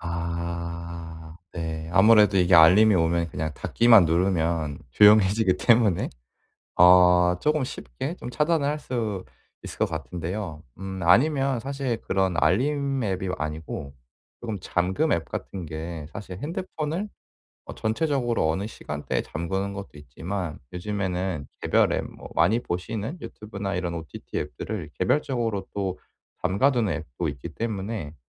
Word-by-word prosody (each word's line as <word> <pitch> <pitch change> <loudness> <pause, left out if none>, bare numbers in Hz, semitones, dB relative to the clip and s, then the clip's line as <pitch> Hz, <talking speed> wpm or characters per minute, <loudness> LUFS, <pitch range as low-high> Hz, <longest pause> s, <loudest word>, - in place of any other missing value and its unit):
아 85 -1 -5 0.2
네. 80 -1 -4
아무래도 105 0 +6
이게 90 0 +4
알림이 95 +6 +7
오면 85 -1 +1
그냥 80 0 -3
닫기만 115 0 +5
누르면 80 -3 0
조용해지기 105 - +5
때문에 115 -6 +3 0.7
어 90 0 +6
쪼금 150 +5 +1
쉽게 125 - -5
좀 125 - -7
차단을 150 +1 +1
할 150 - -1
수 110 -9 -3 0.4
있을 - - -9
것 - - +3
같은데요. 85 +1 -5 0.2
음 95 0 -6
아니면 135 - +3
사실 135 -2 -3
그런 95 -1 0
알림 140 +4 +1
앱이 95 -3 -2
아니고 75 -2 -5 0.5
쪼금 110 -4 -4
잠금 95 - 0
앱 85 - 0
같은 95 -3 -6
게 80 0 -6
사실 95 -2 -7
핸드폰을 165 - -4 0.6
어 - - -7
전체적으로 120 - 0
어느 95 +6 -2
시간대에 75 -8 -4
잠그는 95 +4 -3
것도 100 0 -7
있지만 80 +4 -5
요즘에는 90 -4 -3
개별 - - +3
앱 - - -1
뭐 - - -11
많이 95 +8 +3
보시는 110 - -4
유튜브나 100 -2 -6
이런 90 -1 -2
ott 80 -1 -7 0.2
앱들을 85 - -4
개별적으로 115 -2 0
또 95 -2 -2 0.5
잠가두는 110 +2 +2
앱도 80 +1 -4
있기 70 -3 -6
때문에 100 -7 -4
95 Hz, 295 characters per minute, -25 LUFS, 85-115 Hz, 0.7 s, 알림이